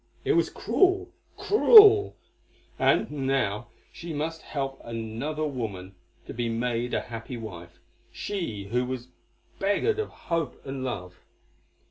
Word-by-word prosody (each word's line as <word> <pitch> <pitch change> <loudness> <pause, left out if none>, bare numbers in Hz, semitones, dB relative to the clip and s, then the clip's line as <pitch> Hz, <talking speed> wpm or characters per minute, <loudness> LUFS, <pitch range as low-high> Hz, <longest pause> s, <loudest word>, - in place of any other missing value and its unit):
It - - +3
was - - +2
cruel, 380 0 +1 0.3
cruel, 420 -1 +7 0.6
and - - +2
now 135 -7 -1 0.3
she 170 -1 -7
must 160 +2 -3
help 135 -2 -5
another 115 +7 -4
woman 105 -9 -5 0.3
to - - -8
be 120 0 -2
made 120 +1 -1
a - - 0
happy 115 +1 -7
wife, 85 -6 -9 0.3
she 165 - -4
who 125 +1 +1
was 125 0 -5 0.5
beggared 205 - +1
of 435 - -2
hope 165 -6 -3
and 135 -1 -5
love. 90 -8 -5
130 Hz, 125 wpm, -26 LUFS, 115-165 Hz, 0.6 s, cruel